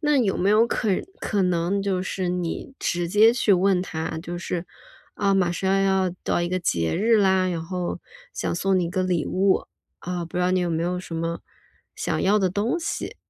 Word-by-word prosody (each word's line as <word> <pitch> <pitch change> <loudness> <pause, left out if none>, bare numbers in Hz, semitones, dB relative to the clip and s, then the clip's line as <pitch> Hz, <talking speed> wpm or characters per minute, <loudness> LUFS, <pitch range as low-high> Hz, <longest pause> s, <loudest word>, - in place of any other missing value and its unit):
那 300 -2 +2
有 220 -8 +2
没 190 - +1
有 215 +2 +5
可 235 -1 -1 0.3
可 205 -2 0
能 180 +2 0
就 195 -2 0
是 185 -1 -3
你 180 +8 -3
直 175 0 -1
接 215 +5 +6
去 235 -4 +2
问 185 0 +3
他。 160 -2 -4
就 175 +1 -5
是， 175 -1 -3 0.5
啊， 200 -1 +1
马 185 -3 +2
上 190 +2 +1
要 190 -1 +2
到 - - 0
一 175 - -1
个 185 +1 -1
节 85 - 0
日 225 +5 +3
啦， 190 -2 +3
然 170 -2 -2
后 180 0 -3 0.3
想 - - -2
送 190 +2 +1
你 180 - +1
一 - - -2
个 185 0 0
礼 180 -4 0
物， 190 +1 +1 0.3
啊， 180 -1 -4
不 165 - -8
知 - - +1
道 180 +1 +2
你 185 - +2
有 175 -1 -1
没 165 0 -1
有 180 +1 -1
什 175 - -8
么 165 +1 -3 0.6
想 - - -1
要 205 +2 +4
的 190 -2 +2
东 210 - -1
西。 330 - -4
185 Hz, 230 characters per minute, -24 LUFS, 175-195 Hz, 0.6 s, 接